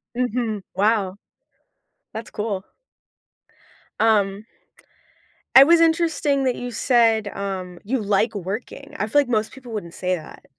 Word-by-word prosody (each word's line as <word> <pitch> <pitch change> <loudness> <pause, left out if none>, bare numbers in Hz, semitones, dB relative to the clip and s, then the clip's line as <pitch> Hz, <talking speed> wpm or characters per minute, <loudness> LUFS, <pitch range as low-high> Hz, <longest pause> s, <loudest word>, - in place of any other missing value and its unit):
Mhm. 235 -4 -2
Wow. 200 -1 +1 1.0
That's 220 +1 -7
cool. 210 -2 -3 1.4
Um 210 -2 +2 1.1
I 270 - +12
was 335 +1 +5
interesting 320 -4 +2
that 250 - +1
you 245 0 -6
said, 225 -2 +2
um, 190 -3 -5
you 240 +3 -1
like 205 +2 +1
working. 200 +4 -6
I 210 - -1
feel 290 +7 +3
like 255 - -5
most 220 -2 0
people 255 -3 -12
wouldn't 185 -6 -6
say 185 0 -1
that. 160 - -11
220 Hz, 130 wpm, -22 LUFS, 200-250 Hz, 1.4 s, I